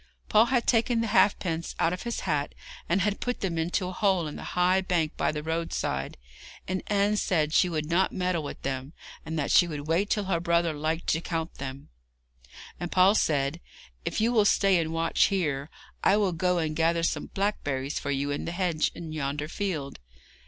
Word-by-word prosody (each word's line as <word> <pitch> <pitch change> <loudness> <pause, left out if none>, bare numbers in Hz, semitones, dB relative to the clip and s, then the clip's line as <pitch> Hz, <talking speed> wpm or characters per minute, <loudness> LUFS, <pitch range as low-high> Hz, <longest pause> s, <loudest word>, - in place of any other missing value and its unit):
Paul 215 +2 +6
had 245 -1 +1
taken 235 0 +2
the - - 0
halfpence 170 -6 +2
out 165 - +2
of 180 - -5
his 235 -1 -3
hat, 145 -1 -1 0.3
and 180 +3 +2
he - - +1
had 210 -1 -1
put 245 0 -3
them 170 -4 -1
into 175 +3 -1
a - - -4
hole 190 -3 +1
in 150 - -6
the - - -7
high 180 +1 +4
bank 170 -4 0
by - - +1
the 150 -1 -5
roadside, 160 - -2 0.5
and 185 0 -2
Anne 205 0 +2
said 155 -6 +1
she 180 - +4
would 155 -3 -2
not 170 +5 +2
meddle 180 -3 -1
with 145 - -8
them, 135 +2 -4 0.3
and 160 +1 -3
that 145 - -1
she 175 - +6
would 150 -3 -5
wait 175 +6 +1
till 210 - +1
her 190 -3 0
brother 170 -1 +1
liked 155 +3 -2
to 165 - +1
count 165 -1 -4
them; 135 0 -7 0.9
and 175 -1 -4
Paul 185 +2 +5
said: 150 -4 +1 0.4
'If - - -2
you 225 +2 +2
will 220 -3 +4
stay 195 -2 +4
and 160 -1 -2
watch 165 0 +2
here, 150 -7 -1 0.3
I 200 - +5
will 200 -4 +1
go 180 +2 +1
and 155 -2 -1
gather 165 +1 +2
some - - -1
blackberries 145 -9 -2
for 145 - -5
you 140 +1 -1
in 145 - -3
the 170 - -4
hedge 175 -4 0
in 165 -2 -7
yonder 150 -1 -3
field. 155 - -4
170 Hz, 205 wpm, -27 LUFS, 155-190 Hz, 0.9 s, Paul